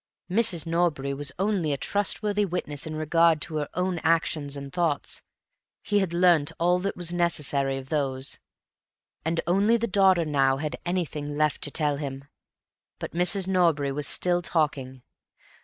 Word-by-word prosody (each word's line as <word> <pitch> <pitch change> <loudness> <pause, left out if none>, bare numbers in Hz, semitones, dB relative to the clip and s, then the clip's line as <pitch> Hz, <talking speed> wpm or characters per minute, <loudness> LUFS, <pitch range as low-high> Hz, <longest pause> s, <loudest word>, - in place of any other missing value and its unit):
Mrs. 190 -6 +2
Norbury 165 -5 0
was 140 -1 -2
only 190 -5 0
a 140 - 0
trustworthy 205 +3 +1
witness 160 -6 -3
in 155 - -5
regard 160 +1 +3
to 155 - -4
her 150 -1 -3
own 180 -1 -1
actions 160 -3 0
and 140 -1 -8
thoughts; 165 -5 -1 0.6
he 205 -1 +1
had 190 -4 -1
learnt 170 -4 +3
all 175 +1 +3
that 195 +2 -3
was 175 -1 -2
necessary 145 -6 0
of 135 0 -9
those, 135 -2 -1 0.8
and 165 +1 0
only 200 +6 +3
the 230 - -1
daughter 190 -5 +3
now 135 -3 +2
had 150 +1 -3
anything 150 -5 -3
left 150 -1 +1
to - - +1
tell 145 -1 0
him. 135 -1 -6 0.7
But - - -6
Mrs. 180 +2 +1
Norbury 165 -7 +2
was 145 +1 -2
still 175 -1 +1
talking. 140 -6 -1
165 Hz, 155 wpm, -26 LUFS, 145-180 Hz, 0.8 s, regard